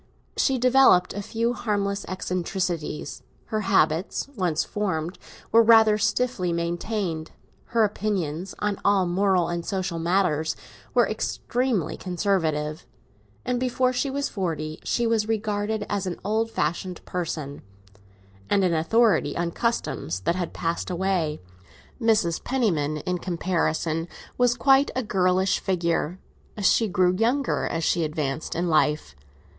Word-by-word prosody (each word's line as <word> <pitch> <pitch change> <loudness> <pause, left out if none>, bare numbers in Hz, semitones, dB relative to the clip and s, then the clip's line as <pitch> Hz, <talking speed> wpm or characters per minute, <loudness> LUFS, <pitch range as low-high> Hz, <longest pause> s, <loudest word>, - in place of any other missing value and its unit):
She 270 -2 +2
developed 255 -7 +5
a 205 - -4
few 230 +3 -1
harmless 200 -4 -1
eccentricities; 180 -4 -3 0.3
her 215 - +1
habits, 190 - +1
once 170 -6 0
formed, 180 -4 -3 0.3
were 230 - +7
rather 220 -2 +6
stiffly 215 -3 0
maintained; 170 0 -2 0.4
her 230 -1 +2
opinions, 195 -5 -2
on 210 -1 -1
all 200 -2 +3
moral 185 0 +2
and 170 0 -3
social 185 -3 -2
matters, 165 -3 +1 0.4
were - - +5
extremely 245 - -1
conservative; 165 -5 -1 0.6
and 250 -1 0
before 255 0 +1
she 265 +3 0
was 280 +1 -1
forty 160 - -3
she 240 - 0
was 225 -2 +1
regarded 215 -1 -1
as 200 -2 -2
an 175 - -4
old 220 +2 +1
fashioned 180 -3 -3
person, 155 -5 -4 0.9
and 200 -1 +3
an 180 -2 +2
authority 180 0 +2
on 170 0 -1
customs 165 - -2
that 170 - +1
had 180 -2 -3
passed 170 +2 -2
away. 180 -4 0 0.6
Mrs. 215 -7 +2
Penniman, 170 - 0
in 180 0 -1
comparison, 165 -2 -1 0.3
was 245 -1 +3
quite 270 +3 +4
a 260 - 0
girlish 185 -2 +2
figure; 170 -2 -1 0.4
she 215 +3 +3
grew 180 -2 +2
younger 245 +7 +1
as 165 0 -2
she 170 +1 +2
advanced 150 -1 -3
in 175 +2 0
life. 155 - +1
185 Hz, 130 wpm, -25 LUFS, 170-220 Hz, 0.9 s, were